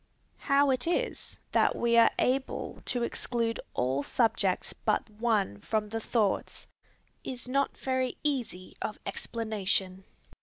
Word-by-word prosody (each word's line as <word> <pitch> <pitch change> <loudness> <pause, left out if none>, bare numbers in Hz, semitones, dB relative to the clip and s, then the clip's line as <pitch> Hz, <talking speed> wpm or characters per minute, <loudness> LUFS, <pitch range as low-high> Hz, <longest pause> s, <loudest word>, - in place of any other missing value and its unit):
How 280 0 +3
it 255 +3 0
is 470 +8 -1
that - - +3
we 235 0 +2
are 230 0 +7
able 265 +1 -1
to 245 -2 -1
exclude 235 -1 0 0.2
all 130 +3 +1
subjects 200 - +1
but 215 - 0
one 210 - 0
from 215 -1 -1
the 225 +1 -2
thoughts, 220 -3 0 0.6
is 250 -1 -5
not 275 +2 0
very 260 -1 -1
easy 245 -11 -2
of 215 - -3
explanation. 200 -4 -1
230 Hz, 125 wpm, -29 LUFS, 210-255 Hz, 0.6 s, are